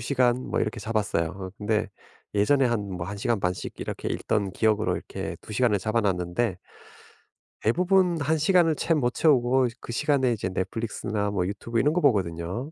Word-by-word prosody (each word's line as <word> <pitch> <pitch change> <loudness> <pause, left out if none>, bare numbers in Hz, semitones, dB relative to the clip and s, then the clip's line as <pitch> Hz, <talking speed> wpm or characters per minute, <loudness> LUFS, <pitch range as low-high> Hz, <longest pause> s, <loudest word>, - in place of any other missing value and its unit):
시간 125 0 +2
뭐 - - 0
이렇게 110 +2 -1
잡았어요. 105 -7 0
어 95 0 -7
근데 105 +1 0 0.5
예전에 135 +7 +3
한 105 -5 -1
뭐 85 -1 -4
1 100 - -5
시간 105 +1 0
반씩 90 0 -3
이렇게 - - -4
읽던 100 -2 -1
기억으로 110 +1 +1
이렇게 - - -6
2 - - -10
시간을 105 -2 +2
잡아 110 +4 0
놨는데 90 +1 -1 1.0
대부분 180 - +2
1 155 +3 +1
시간을 165 0 +3
채 165 - +1
못 125 -5 +1
채우고 130 -4 +3
그 - - -7
시간에 135 -1 +2
이제 100 -3 -3
넷플릭스나 105 +1 -2
뭐 95 -3 0
유튜브 115 +4 -2
이런 145 +6 +3
거 180 - +1
보거든요. 95 - 0
115 Hz, 355 characters per minute, -26 LUFS, 100-135 Hz, 1.0 s, 예전에